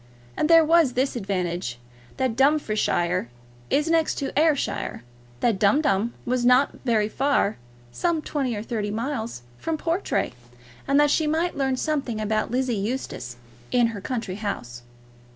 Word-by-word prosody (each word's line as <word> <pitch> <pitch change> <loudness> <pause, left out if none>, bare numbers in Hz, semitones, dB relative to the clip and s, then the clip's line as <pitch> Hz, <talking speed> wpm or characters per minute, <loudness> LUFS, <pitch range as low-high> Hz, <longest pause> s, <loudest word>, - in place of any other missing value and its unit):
And 305 - 0
there 330 -1 +7
was 325 -5 +4
this 260 +2 0
advantage, 180 - -2 0.4
that 260 -3 0
Dumfriesshire 215 - +1 0.4
is 295 +2 +2
next 325 -1 +2
to 275 - -3
Ayrshire, 300 - +1 0.4
that 225 -5 +2
Dumdum 230 -1 +2
was 250 0 0
not 250 +3 +5
very 225 -5 +2
far, 270 -3 +1 0.3
some 340 - 0
twenty 265 -6 -2
or 205 - -4
thirty 220 -3 -3
miles, 225 - -3 0.2
from 325 -1 -2
Portray, 335 - -1 0.5
and 275 +1 +4
that 295 -1 +4
she 310 0 +2
might 325 +3 0
learn 265 -2 0
something 275 -7 -1
about 215 0 0
Lizzie 255 +1 0
Eustace 200 - -4 0.3
in 245 -1 +3
her 205 - -6
country 225 -5 -4
house. 120 - -5
250 Hz, 145 wpm, -24 LUFS, 210-295 Hz, 0.5 s, there